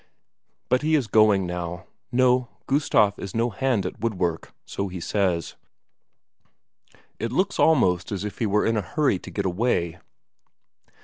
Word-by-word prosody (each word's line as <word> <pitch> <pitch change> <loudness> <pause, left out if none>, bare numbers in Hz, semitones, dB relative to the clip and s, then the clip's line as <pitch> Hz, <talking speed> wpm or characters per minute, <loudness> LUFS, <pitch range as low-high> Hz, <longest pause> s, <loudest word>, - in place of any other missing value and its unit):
But 125 - +2
he 155 +1 +2
is 140 -5 +1
going 105 -2 +4
now. 90 0 -5 0.3
No, 125 -1 +3 0.2
Gustaf 110 -8 +2
is 100 - -7
no 115 +1 +1
hand 125 -1 0
at - - -5
woodwork, 90 -7 -2
so 100 - -3
he 90 -1 -6
says. 90 -2 -1 1.6
It 115 - -3
looks 185 +10 0
almost 90 - +3
as 100 0 -3
if 105 -1 -7
he 115 - +1
were 105 +1 +2
in 115 0 +1
a - - +1
hurry 135 - 0
to - - -10
get 100 - -3
away. 90 -3 0
105 Hz, 150 wpm, -24 LUFS, 90-125 Hz, 1.6 s, going